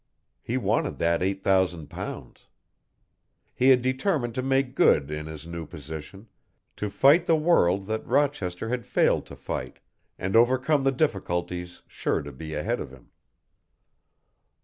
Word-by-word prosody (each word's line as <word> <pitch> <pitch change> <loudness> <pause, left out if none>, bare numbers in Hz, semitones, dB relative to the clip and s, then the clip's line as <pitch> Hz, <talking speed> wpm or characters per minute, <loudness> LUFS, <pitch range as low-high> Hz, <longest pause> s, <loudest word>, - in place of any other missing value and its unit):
He - - -2
wanted - - 0
that 85 0 +1
eight 95 +1 -1
thousand 90 -5 +1
pounds. - - -8 1.1
He 130 - +3
had 125 -2 +5
determined 130 - 0
to 130 - -2
make 135 0 +1
good 75 - +3
in 75 0 -4
his 80 0 -8
new 85 -2 -6
position, 80 - -9 0.5
to 105 - -2
fight 140 - +4
the 165 - +5
world 100 - +3
that 110 +2 -3
Rochester 120 -8 0
had 125 0 -2
failed - - +2
to - - -10
fight, - - -5 0.4
and 95 +2 -2
overcome 130 +5 +3
the 135 - +4
difficulties 90 - -2
sure - - -2
to 70 - -8
be 80 +3 -7
ahead 75 - -1
of - - -6
him. 65 -1 -17
100 Hz, 150 wpm, -26 LUFS, 85-130 Hz, 1.1 s, had